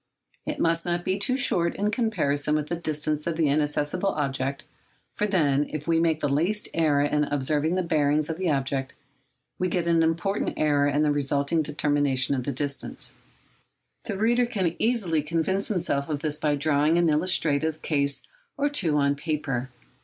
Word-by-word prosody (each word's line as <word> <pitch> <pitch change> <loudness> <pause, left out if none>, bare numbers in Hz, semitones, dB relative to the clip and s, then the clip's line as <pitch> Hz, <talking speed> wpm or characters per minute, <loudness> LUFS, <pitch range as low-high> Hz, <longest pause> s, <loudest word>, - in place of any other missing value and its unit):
It - - -2
must 165 0 +1
not 175 0 -2
be 190 +1 0
too 255 +6 +1
short 170 -10 +2
in 205 +1 0
comparison 155 - 0
with 150 -1 -2
the 170 - -1
distance 155 -2 -2
of 165 -2 -2
the 160 -3 +2
inaccessible 150 +5 0
object; 140 -4 -2 0.5
for 210 - -1
then, 150 -7 +2
if 155 0 -6
we 165 -1 +3
make 160 -2 +1
the 145 - +1
least 170 +10 0
error 155 -3 +2
in 150 0 +1
observing 145 +4 0
the 185 - 0
bearings 150 -2 +1
of 160 - -4
the 185 -2 0
object, 135 -2 -2 0.6
we 185 - +1
get 175 -1 -1
an 170 -1 +3
important 170 +5 0
error 145 -2 +2
in 145 +1 +1
the 150 - +2
resulting 145 +2 +1
determination 145 -3 0
of 130 -3 -2
the 140 - -1
distances. 140 +1 -3 0.9
The 205 -4 -3
reader 240 +3 +2
can 190 -8 -1
easily 205 -10 +1
convince 170 +6 -1
himself 160 -7 -1
of 145 -2 -2
this 150 -1 -2
by 150 -1 +1
drawing 150 +2 +2
an 175 -1 +3
illustrative 155 -1 +2
case 140 -2 +1 0.3
or 290 +1 +1
two 175 - 0
on 140 -1 +2
paper. 140 -5 -3
155 Hz, 175 wpm, -25 LUFS, 145-175 Hz, 0.9 s, we